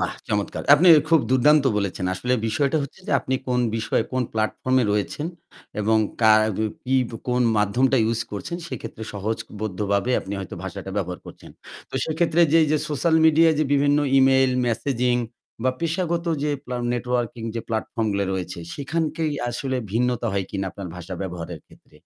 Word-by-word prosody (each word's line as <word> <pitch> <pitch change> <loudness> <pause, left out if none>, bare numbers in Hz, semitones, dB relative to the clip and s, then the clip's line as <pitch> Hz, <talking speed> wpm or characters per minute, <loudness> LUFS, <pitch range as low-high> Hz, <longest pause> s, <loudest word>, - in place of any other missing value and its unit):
বাহ, - - -1 0.2
চমৎকার! 105 -1 -2
আপনি 175 +4 +5 0.2
খুব 165 -2 +5
দুর্দান্ত 140 +3 +5
বলেছেন। 100 -2 -2
আসলে 125 +6 -2
বিষয়টা 140 +6 +1
হচ্ছে 140 +7 -9
যে - - -2
আপনি 130 - -2
কোন 125 -1 +1 0.2
বিষয়ে 110 0 0
কোন 130 0 +1
প্লাটফর্ম 110 +4 0
এ - - +1
রয়েছেন 105 +9 -2 0.5
এবং 110 +1 +3 0.2
কা 110 0 +7 0.2
বি 110 - 0 0.2
পি 130 +1 0 0.3
কোন 125 0 +2 0.2
মাধ্যমটা 125 +6 +2
use 115 0 -1
করছেন 105 - -4
সেক্ষেত্রে 120 -4 -7
সহজবদ্ধভাবে 105 0 -2
আপনি 95 - -8
হয়তো 95 - -7
ভাষাটা 95 0 -6
ব্যবহার 90 -3 -2
করছেন। - - -12 0.4
তো - - -11
সেক্ষেত্রে 160 +1 +1
যে, 165 - +6
যে 155 - +3
সোশ্যাল 155 +3 +1
মিডিয়ায় 160 0 +5
যে 155 - +2
বিভিন্ন 145 +1 +3 0.2
ইমেইল, 135 0 +5 0.2
মেসেজিং 125 +1 0 0.5
বা 130 - +3
পেশাগত 170 +1 -1 0.2
যে 150 - 0
প্লাম 125 -1 -4
নেটওয়ার্কিং 120 -1 -2
যে 115 - -2
প্লাটফর্ম 110 0 -2
গুলা 100 0 0
রয়েছে 90 -2 -4 0.2
সেখানেই 155 +2 -2 0.2
আসলে 130 +2 -2 0.2
ভিন্নতা 120 +1 0
হয় 100 -1 -1
কিনা 95 -1 -3
আপনার 95 -3 -8
ভাষা 90 +1 -7
ব্যবহারের 85 -3 -6
ক্ষেত্রে? - - -21
125 Hz, 165 wpm, -23 LUFS, 105-145 Hz, 0.5 s, কা